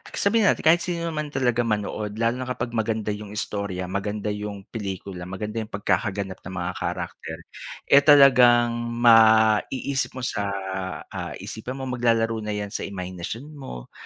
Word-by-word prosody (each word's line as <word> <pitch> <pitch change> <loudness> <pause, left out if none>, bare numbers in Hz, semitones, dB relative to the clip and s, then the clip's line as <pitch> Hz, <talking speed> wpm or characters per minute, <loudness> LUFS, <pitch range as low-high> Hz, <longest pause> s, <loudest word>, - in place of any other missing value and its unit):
sabihin 215 +2 +3
natin - - +2
kahit 165 +2 +6
sino 170 -1 -2
naman 150 -1 -3
talaga 125 -3 +1
manood 105 0 -2
lalo 115 +1 +1
na 130 - -4
kapag 125 -1 -3
maganda 110 -2 -1
yung 105 0 -7
istorya, 100 -4 -3
maganda 105 +1 -2
yung 105 -1 -5
pelikula, 95 -4 -5
maganda 105 +4 -4
yung 110 0 -6
pagkakaganap 100 -2 -1
ng 95 - -9
mga 85 - -2
character, - - -4 0.5
eh, 140 - +9
talagang 125 -5 +7 0.3
maiisip 115 +4 +4
mo 130 - -6
sa, 105 -4 -1 0.6
ah, - - -5
isipan 120 +4 -6
mo 135 - -6
maglalaro 115 -2 +1
na 105 -1 -3
yan 105 -1 -4
sa - - -4
imahinasyon 95 - -6
mo, 130 - -9
110 Hz, 155 wpm, -24 LUFS, 100-125 Hz, 0.6 s, eh